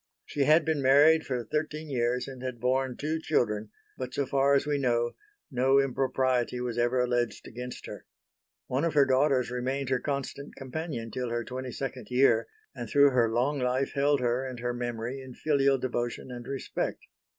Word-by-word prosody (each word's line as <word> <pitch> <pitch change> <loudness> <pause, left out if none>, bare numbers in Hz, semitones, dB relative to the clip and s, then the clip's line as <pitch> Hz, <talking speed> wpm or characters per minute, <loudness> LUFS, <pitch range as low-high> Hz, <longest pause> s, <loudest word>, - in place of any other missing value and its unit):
She 140 -2 0
had 155 +2 +5
been 160 -3 0
married 145 +4 +5
for 125 -3 -2
thirteen 155 +5 -3
years 125 -2 0
and 130 -2 -9
had 130 -2 -5
borne 130 +1 0
two 155 +2 -2
children, 110 -8 0 0.3
but 130 -1 -5
so 140 - 0
far 140 +1 +3
as 140 - +2
we 145 -1 0
know 120 -3 +1 0.4
no 135 +1 +3
impropriety 130 -2 0
was 125 -2 -3
ever 120 +1 +1
alleged 120 -1 -1
against 125 +2 -7
her. - - -9 0.6
One 130 +4 -1
of 170 -2 0
her 140 -2 +6
daughters 130 -1 +2
remained 130 +2 -2
her 130 -1 +2
constant 140 +1 -4
companion 135 -4 -5
till 125 +2 -3
her 120 0 -2
twenty 130 +1 -5
second 135 0 -5
year 125 -3 +3 0.3
and 120 -4 -6
through 140 0 +6
her 120 -3 +3
long 130 +5 +1
life 130 +2 0
held 140 0 +2
her 120 +1 +1
and 130 -2 -6
her 120 +1 -2
memory 120 +2 -4
in 130 -2 -10
filial 140 -3 +2
devotion 120 0 -3
and 120 -1 -8
respect. 135 -1 -3
130 Hz, 185 wpm, -28 LUFS, 120-140 Hz, 0.6 s, her